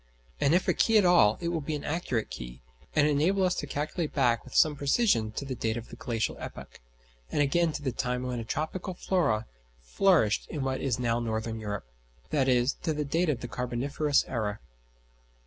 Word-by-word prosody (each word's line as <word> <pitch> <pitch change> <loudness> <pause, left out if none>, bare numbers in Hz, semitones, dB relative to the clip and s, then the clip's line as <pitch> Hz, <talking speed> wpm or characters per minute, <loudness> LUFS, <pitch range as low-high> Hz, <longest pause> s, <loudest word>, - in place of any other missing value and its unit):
And 145 +3 +3
if 180 - +1
a - - +4
key 225 -1 +3
at 205 - +5
all, 170 -12 +5
it 170 - -1
will 165 -2 -1
be 150 +2 -3
an 145 - -5
accurate 145 -8 -2
key, - - -8 0.3
and 150 - +5
enable 165 +7 +2
us 180 -1 +3
to 145 - -3
calculate 150 +3 -3
back 120 -5 +2
with 130 - -12
some 155 -1 +5
precision 140 - +2
to 140 - -4
the 135 - -3
date 115 -2 -2
of 115 - -7
the - - -9
glacial 115 -4 -2
epoch; - - -9 0.5
and - - -2
again 165 +4 +2
to 150 - -5
the 130 - 0
time 125 +1 -2
when 125 -1 -3
a - - -4
tropical 170 - -3
flora 120 - +1 0.3
flourished 110 - +2
in 150 -4 -3
what 130 0 -1
is 130 -4 0
now 120 -2 0
northern 110 -1 -3
Europe, 105 - -4 0.5
i.e. 130 -4 +3
to 160 - 0
the 150 0 -2
date 165 +4 +1
of 130 -5 -1
the 120 - -4
Carboniferous 125 +5 0
era. 105 -4 -2
135 Hz, 200 wpm, -28 LUFS, 115-155 Hz, 0.5 s, at